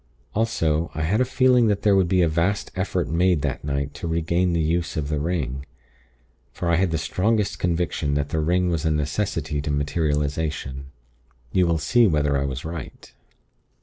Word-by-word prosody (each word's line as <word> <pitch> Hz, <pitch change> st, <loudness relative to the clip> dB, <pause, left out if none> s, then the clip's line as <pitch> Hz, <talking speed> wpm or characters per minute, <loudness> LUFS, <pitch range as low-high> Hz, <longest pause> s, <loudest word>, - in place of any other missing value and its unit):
Also, 85 Hz, -8 st, 0 dB
I 80 Hz, -, -2 dB
had 105 Hz, +9 st, +1 dB
a -, -, +3 dB
feeling 125 Hz, -2 st, +4 dB
that 100 Hz, -2 st, 0 dB
there 105 Hz, -2 st, +4 dB
would 95 Hz, -2 st, +3 dB
be 90 Hz, 0 st, +3 dB
a -, -, +3 dB
vast 85 Hz, +6 st, 0 dB
effort 90 Hz, -3 st, -1 dB
made 85 Hz, 0 st, +2 dB
that 70 Hz, -3 st, -2 dB
night 70 Hz, 0 st, -2 dB
to 70 Hz, +4 st, -6 dB
regain 85 Hz, +2 st, +1 dB
the 85 Hz, -, +1 dB
use 85 Hz, +2 st, -1 dB
of 75 Hz, -2 st, -2 dB
the 75 Hz, -1 st, -1 dB
ring. 70 Hz, -5 st, -2 dB, 0.9 s
For 85 Hz, -1 st, -2 dB
I 85 Hz, -, +3 dB
had 95 Hz, +1 st, +2 dB
the 80 Hz, -, -1 dB
strongest 105 Hz, +5 st, 0 dB
conviction 85 Hz, -4 st, -1 dB
that 75 Hz, 0 st, -1 dB
the 80 Hz, -, -1 dB
ring 90 Hz, +3 st, +1 dB
was 80 Hz, -2 st, -1 dB
a 80 Hz, -, +2 dB
necessity 75 Hz, -1 st, -1 dB
to 75 Hz, -, -4 dB
materialization. 75 Hz, -2 st, -1 dB, 0.6 s
You 90 Hz, -2 st, +3 dB
will 85 Hz, -1 st, +2 dB
see 120 Hz, +8 st, +3 dB
whether 75 Hz, -4 st, +1 dB
I 70 Hz, 0 st, 0 dB
was 65 Hz, 0 st, -4 dB
right. 80 Hz, -3 st, -8 dB
80 Hz, 185 wpm, -23 LUFS, 75-90 Hz, 0.9 s, feeling